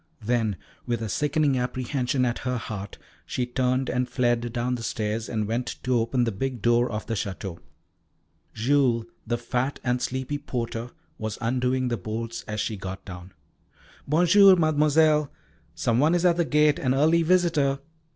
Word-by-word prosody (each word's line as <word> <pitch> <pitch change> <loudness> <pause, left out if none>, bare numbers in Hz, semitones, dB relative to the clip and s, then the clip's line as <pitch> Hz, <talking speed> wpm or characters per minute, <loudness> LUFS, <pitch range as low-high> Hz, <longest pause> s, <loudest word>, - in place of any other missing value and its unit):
Then 115 -3 +1 0.3
with 120 -1 -1
a 110 - -3
sickening 150 +2 +1
apprehension 125 +1 -1
at 120 -1 -1
her 125 -1 -2
heart, 105 -4 -6 0.3
she 125 - -2
turned 130 +1 0
and 125 0 -1
fled 120 -1 0
down 120 +1 -1
the 120 - -3
stairs 110 0 -2
and 110 -2 -1
went 120 +3 -2
to 130 - 0
open 120 +2 +1
the 115 - 0
big 125 +5 -3
door 120 +3 +3
of 105 0 -4
the - - -3
Château. 95 -4 -4 0.9
Jules, 120 -1 +2 0.2
the 120 +1 0
fat 125 +3 -2
and 125 -1 0
sleepy 130 +3 -2
porter, 120 -2 -4 0.3
was 110 -1 -4
undoing 125 +2 0
the 120 - -1
bolts 110 +3 -5
as 110 0 -3
she 110 0 -2
got 95 0 -7
down. 90 0 -9 0.8
"Bonjour, 180 +6 +6
Mademoiselle. 155 -2 +3 0.4
Some 115 +1 +1
one 155 +5 +4
is 175 +1 +1
at 175 -1 +4
the 170 - +2
gate, 150 -1 +3
an 130 0 +1
early 160 +4 +4
visitor." 165 -5 +2
125 Hz, 165 wpm, -25 LUFS, 115-145 Hz, 0.9 s, Bonjour